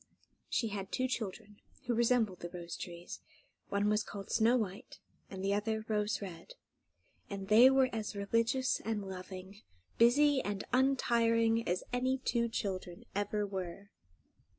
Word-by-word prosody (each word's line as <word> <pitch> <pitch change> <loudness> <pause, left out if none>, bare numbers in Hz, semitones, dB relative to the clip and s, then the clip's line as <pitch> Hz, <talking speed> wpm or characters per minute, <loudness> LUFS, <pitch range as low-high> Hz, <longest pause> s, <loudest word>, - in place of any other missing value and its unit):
She 230 - 0
had 195 -2 -5
two 255 0 0
children, 210 -3 -5 0.3
who 245 - 0
resembled 230 -5 +2
the 175 - -6
rose 170 -1 -7
trees. 175 0 -7 0.5
One 200 +1 +1
was 210 0 +3
called 200 -2 -8
Snow 230 +2 +4
White, 200 -4 -4 0.3
and 190 -1 -6
the 200 - +2
other 220 +1 -1
Rose 210 -1 0
Red; 190 - -9 0.7
and 195 -1 -6
they 235 +5 +8
were 265 -1 +4
as 220 -1 -3
religious 230 +6 +1
and 210 -3 -3
loving, 190 +1 -8 0.4
busy 270 +4 +5
and 200 -1 -3
untiring, 230 -3 +3
as 180 +1 0
any 255 +1 +1
two 235 -2 0
children 185 -5 -4
ever 205 +1 -1
were. 195 0 -6
210 Hz, 145 wpm, -33 LUFS, 195-235 Hz, 0.7 s, they